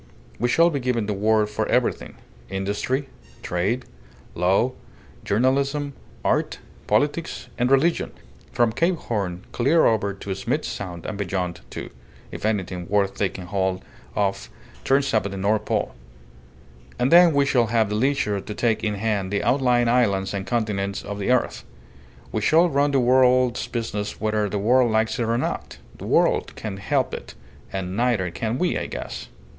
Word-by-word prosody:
We 120 +2 +1
shall 165 +7 +4
be 140 - -1
giving 125 -4 0
the 105 - -1
word 105 +1 +2
for 105 - -2
everything: - - 0 0.3
industry, 100 +8 -2 0.4
trade, 100 +9 -1 0.5
law, 95 +8 +2 0.5
journalism, 140 +5 +1 0.3
art, - - +1 0.3
politics, 150 +3 0
and 125 +1 +1
religion, 145 +5 +2 0.4
from 120 -2 +2
Cape 170 +10 +1
Horn 100 - -3
clear 145 +7 +3
over 100 -3 +1
to 100 0 -5
Smith's 95 - -2
Sound, 90 -4 -6
and 105 -1 -5
beyond, 90 -3 -2
too, - - -7 0.4
if - - -3
anything 95 -4 -2
worth 100 -1 +2
taking 95 -2 -2
hold 95 0 -1 0.3
of 100 -1 -1 0.3
turns 135 -1 +2
up 110 -3 +2
at - - -7
the 100 - -5
North 105 +2 +1
Pole. - - -1 1.0
And 125 +2 +1
then 175 0 +8
we 140 -2 +3
shall 125 -4 +2
have 110 -2 +2
the 105 - -1
leisure 110 -5 +1
to 105 - -7
take 115 -2 0
in 105 -1 0
hand 100 -2 -1
the 100 - 0
outlying 125 -3 +3
islands 100 -6 +2
and 100 -1 -4
continents 100 -4 -1
of 100 0 -6
the 100 - -2
earth. 125 -1 +1 0.7
We - - -1
shall 170 +3 +4
run 145 0 +2
the 140 -1 +2
world's 125 -1 +3
business 110 -4 -4
whether 110 -1 0
the 105 - -2
world 120 +4 +3
likes 110 +3 +1
it - - +2
or 115 +1 +1
not. 125 - -3 0.2
The - - -7
world - - +2
can't 100 -3 -6
help 100 - 0
it - - -7 0.4
and 95 -1 -4
neither 115 -6 +1
can 115 +6 -2
we, 180 +3 0
I - - -4
guess." - - -6
110 Hz, 165 wpm, -23 LUFS, 100-125 Hz, 1.0 s, then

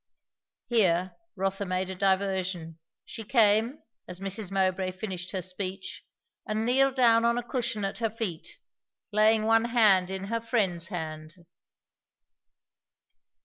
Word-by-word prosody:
Here 185 -6 +1 0.2
Rotha 195 +1 -2
made 185 0 -2
a - - -6
diversion. 185 -3 -1 0.3
She 225 - -8
came, 225 +3 +3 0.2
as 180 0 -7
Mrs. 195 0 -3
Mowbray 190 -1 0
finished 185 -2 -6
her 185 -2 -4
speech, 185 +1 -5 0.4
and 215 +1 -1
kneeled 265 +2 +3
down 230 -3 +5
on 235 0 +2
a 245 - -2
cushion 235 -4 -2
at 195 - -4
her 225 -1 0
feet, 205 -7 -5 0.5
laying 215 +1 +4
one 225 +1 +3
hand 210 -6 +4
in 190 0 -4
her 230 +3 -2
friend's 195 -8 0
hand. 155 -3 -6
195 Hz, 130 wpm, -27 LUFS, 185-225 Hz, 0.5 s, down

